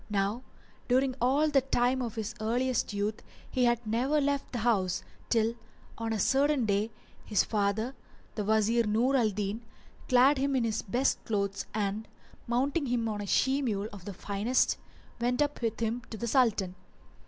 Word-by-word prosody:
Now 205 +3 0 0.5
during 260 +1 +3
all 275 +5 +3
the 280 -2 +4
time 255 0 +1
of 235 -3 -4
his 220 0 -3
earliest 245 +3 0
youth 205 +1 -2 0.3
he 250 -1 +2
had 240 0 +1
never 250 +7 +1
left 285 -1 -1
the 245 - -3
house, 190 -6 +1 0.3
till 230 -1 +2 0.4
on 225 0 -3
a 220 - 0
certain 275 +4 +2
day 205 +1 +1 0.3
his 210 -3 +2
father, 215 +4 0 0.4
the 210 - -2
Wazir 220 +2 +2
Nur 235 +6 +2
al 235 -5 +3
Din, 205 +2 -3 0.5
clad 260 +3 +5
him 275 0 +1
in 255 - +2
his 225 -2 0
best 245 +6 0
clothes 200 -3 -2
and, 210 +1 -1 0.4
mounting 275 +5 0
him 240 -2 0
on 210 -2 -3
a 205 - -5
she 270 +7 +2
mule 215 -5 -1
of 195 -3 -10
the 200 - -5
finest, 205 +7 +1 0.4
went 245 +1 0
up 290 -2 0
with 230 -2 -1
him 230 +1 -1
to 220 - -6
the 235 - -3
Sultan. 220 -7 +2
230 Hz, 175 wpm, -30 LUFS, 210-255 Hz, 0.5 s, clad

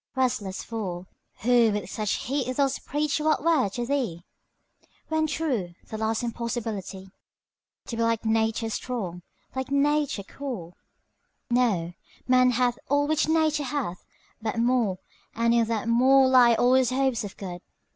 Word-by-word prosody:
Restless 225 -7 -1
fool, 190 -6 -5 0.4
Who 235 0 +4
with 210 - -3
such 215 -2 -2
heat 260 -1 -2
dost 275 -1 0
preach 295 +1 0
what 310 -1 +1
were 315 -10 +3
to 240 +5 -4
thee, 235 -11 -2 0.8
When 315 0 +1
true, 255 - -2
the 220 - -5
last 220 +1 0
impossibility 220 -5 -4 0.7
To 235 - -5
be - - -1
like 230 -1 0
Nature 225 0 +1
strong, 200 -8 -4 0.3
like 260 +1 -3
Nature 285 -5 +1
cool! 200 -9 -7 0.8
Know, 205 -9 +1 0.3
man 255 0 +5
hath 245 0 +1
all 285 +1 +3
which 310 +1 +1
Nature 315 -2 +2
hath, 245 -10 -3 0.4
but 220 0 -3
more, 230 -5 +2 0.4
And 230 +1 +2
in 235 -1 +4
that 225 -1 -2
more 260 +3 +5
lie 250 -2 +6
all 245 +2 +3
his 260 -2 +4
hopes 260 -3 0
of 205 - -8
good. 180 -3 -7
240 Hz, 145 wpm, -26 LUFS, 215-270 Hz, 0.8 s, lie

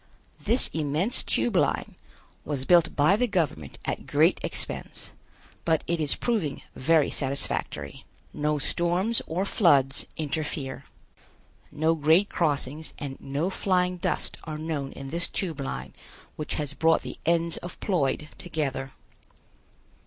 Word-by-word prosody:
This 230 +5 +5
immense 155 - 0
Tube - - +1
Line - - +1 0.5
was 140 -3 -3
built 170 0 +5
by 150 +7 +5
the 245 +3 +2
government 150 - -1
at - - -3
great - - +4
expense, - - -3 0.5
but 160 -2 +2
it 170 -1 -1
is 150 - +2
proving 210 - -1
very 155 +2 +3
satisfactory. 135 - -2 0.3
No 150 0 0
storms 175 +9 +2
or 180 +5 -1
floods 140 -10 +4
interfere. 145 -3 -3 0.9
No 160 +2 +2
grade 165 +6 +4
crossings 150 -1 -1
and 140 -2 -5
no 145 +7 -1
flying 180 -2 +1
dust - - -1
are 155 -1 -4
known 155 -3 -3
in 135 0 -8
this 170 +1 0
Tube 165 -7 -2
Line 65 - -4 0.4
which 150 - -4
has 145 -2 -3
brought 160 +2 +3
the - - -7
ends 170 0 +3
of 175 - -8
Ploid 150 -5 0
together. 135 -6 -3
155 Hz, 130 wpm, -27 LUFS, 140-175 Hz, 0.9 s, This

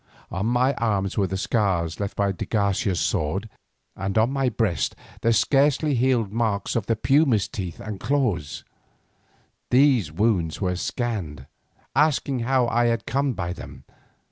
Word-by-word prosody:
On 95 +4 -2
my 125 +3 +2
arms 100 -4 0
were 100 -2 +1
the 95 +2 -3
scars 95 -6 0
left 100 -1 -4
by 100 -1 +2
de 90 - -5
Garcia's 100 -3 0
sword, 95 +3 -1 0.5
and 95 +2 -3
on 110 +4 +3
my 135 -2 +1
breast 105 - -1 0.3
the 115 - +3
scarcely 140 +6 +3
healed 120 -4 +1
marks 110 -3 -1
of 115 -4 -1
the 115 - +2
puma's 130 -3 +3
teeth 90 -5 -6
and 105 -3 -6
claws. 110 - -1 1.1
These 125 - +4
wounds 90 -3 +1
they 90 -2 -1
scanned, 90 - -3 0.5
asking 140 -2 +2
how 125 +1 +2
I 120 +1 +2
had 115 -1 0
come 135 +1 0
by 90 -4 -3
them. 90 - -11
110 Hz, 150 wpm, -24 LUFS, 95-125 Hz, 1.1 s, These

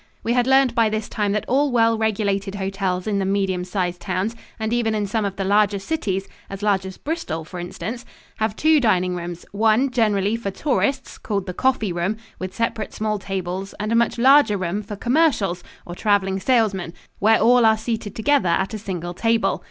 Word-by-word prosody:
We 230 - +1
had 245 0 +2
learned 265 -2 +4
by 230 -2 +3
this 215 0 -3
time 205 -2 -1
that 210 - -1
all 280 +2 +2
well 230 -1 +3
regulated 205 -3 -1
hotels 190 -2 -2
in 205 -2 0
the - - 0
medium 190 -2 0
sized 180 -1 -3
towns, 195 +4 -2 0.2
and 220 +1 -1
even 225 -2 +1
in 210 -1 0
some 210 +1 -1
of 195 -1 -3
the 195 - -2
larger 205 +1 +3
cities 195 -5 -2 0.2
as 195 +1 -7
large 195 -2 +1
as 190 - -9
Bristol, 285 - -4
for 180 +2 -8
instance 190 +7 -6 0.3
have 220 -1 -1
two 310 +3 +4
dining 185 -7 +2
rooms, 175 0 -6
one, 225 +5 +2
generally 210 -3 +1
for 230 -3 -3
tourists, 270 +4 -1
called 200 -3 -2
the 180 - -5
"coffee 225 -5 0
room," 175 +5 -1 0.2
with 185 0 -6
separate 230 -2 -2
small 215 -1 -1
tables, 190 0 -4
and 210 +2 -2
a - - +2
much 235 +1 +2
larger 260 -3 +5
room 185 +2 -2
for 205 0 -7
"commercials," 240 - +1 0.2
or 175 - -7
traveling 195 -1 +1
salesmen, 195 -7 +1 0.3
where 220 +2 +4
all 245 +2 +5
are 220 -1 +5
seated 220 -2 -4
together 250 -4 +2
at 190 +5 0
a 215 - -4
single 175 -4 -5
table. 225 +4 +1
210 Hz, 200 wpm, -22 LUFS, 190-230 Hz, 0.3 s, larger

